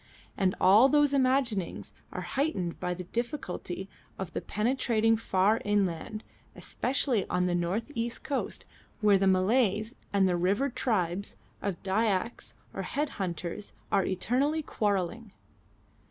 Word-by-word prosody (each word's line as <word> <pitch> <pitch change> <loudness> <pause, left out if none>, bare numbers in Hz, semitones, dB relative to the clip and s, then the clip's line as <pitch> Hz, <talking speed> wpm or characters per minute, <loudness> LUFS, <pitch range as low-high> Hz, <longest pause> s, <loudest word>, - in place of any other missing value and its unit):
And 190 -1 +1
all 210 +8 +7
those 290 0 +4
imaginings 255 -8 +1 0.2
are - - -4
heightened 265 - -1
by 180 -1 -2
the 180 - -6
difficulty 195 - -4 0.3
of 190 -3 -5
penetrating 225 0 +2
far 210 0 +2
inland, 205 +1 -1 0.3
especially 250 -5 0
on 180 0 +1
the 180 - +1
north 180 +9 -1
east 235 -1 -3
coast, 280 -3 -2 0.4
where 205 -2 +5
the 195 - +3
Malays 210 +3 +2 0.2
and 195 -1 +3
the 180 -1 +1
river 200 +10 +1
tribes 200 -6 -1 0.2
of 195 -4 -3
Dyaks 200 +2 0 0.2
or - - -3
Head 295 0 -2
hunters 175 +2 -3 0.2
are 195 -1 +4
eternally 270 - 0
quarrelling. 205 -1 -1
205 Hz, 125 wpm, -29 LUFS, 185-240 Hz, 0.4 s, all